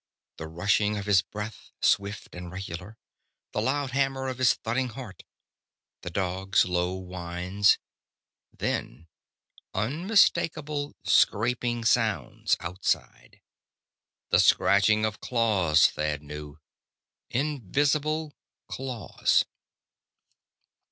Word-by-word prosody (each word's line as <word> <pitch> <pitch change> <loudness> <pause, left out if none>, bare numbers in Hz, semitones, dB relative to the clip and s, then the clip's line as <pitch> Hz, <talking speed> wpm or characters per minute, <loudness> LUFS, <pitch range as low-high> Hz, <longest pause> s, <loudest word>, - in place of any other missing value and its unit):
The 80 - -6
rushing 105 +5 +1
of 100 - -4
his 100 -3 +4
breath, 105 +2 -8
swift 100 +1 0
and 90 -1 -8
regular. 95 +2 -7 0.5
The 105 - -1
loud 135 +3 -1
hammer 135 0 0
of 130 -1 -6
his 125 -1 +4
thudding 125 +3 -2
heart. 110 -7 -9 0.8
The - - -5
dog's 95 +2 +1
low 90 0 0
whines. 90 +2 0 0.7
Then 80 +7 -4 0.7
unmistakable 155 - +1
scraping 120 +1 +2
sounds, 110 - +1
outside. 90 +3 -3 0.9
The - - +5
scratching 105 +2 +4
of 110 -1 -3
claws, 95 -10 +3
Thad 75 -1 -2
knew. 75 0 -8 0.7
Invisible 145 - 0 0.3
claws! 130 -4 0
105 Hz, 90 wpm, -27 LUFS, 90-130 Hz, 0.9 s, The